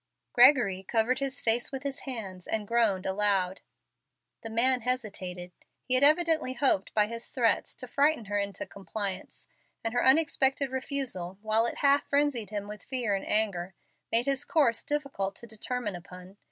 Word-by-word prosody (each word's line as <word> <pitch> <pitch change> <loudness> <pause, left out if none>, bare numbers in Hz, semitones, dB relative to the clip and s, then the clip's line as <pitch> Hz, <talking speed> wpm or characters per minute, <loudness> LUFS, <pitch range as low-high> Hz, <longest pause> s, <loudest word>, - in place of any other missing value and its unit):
Gregory 240 -7 +5
covered 230 +5 0
his 275 -2 -2
face 235 +1 +2
with 270 -1 -6
his 280 -1 -3
hands 200 -9 -7
and 215 -2 -2
groaned 220 -5 +1
aloud. 190 -1 0 0.8
The 225 - -7
man 245 +3 +3
hesitated. 195 -8 -4 0.3
He 255 - -1
had 255 +2 +4
evidently 310 -2 +4
hoped 260 -7 +1
by 210 -1 +4
his 230 +2 -5
threats 240 -3 +1
to 255 - -6
frighten 280 -1 +1
her 205 0 -1
into 200 -1 -4
compliance, 200 -1 -5 0.4
and 225 0 -2
her 245 - +1
unexpected 275 -2 +3
refusal, 260 -9 -2
while 220 +2 +2
it - - -5
half 280 +1 +3
frenzied 280 -7 +1
him 205 -1 -5
with 210 -1 -9
fear 245 -6 -1
and 195 - -3
anger, 190 -4 0 0.4
made 235 +2 +2
his 275 -1 +1
course 275 -9 +2
difficult 275 -10 -3
to 235 - -3
determine 225 -1 -4
upon. 180 +2 -12
230 Hz, 165 wpm, -28 LUFS, 200-265 Hz, 0.8 s, Gregory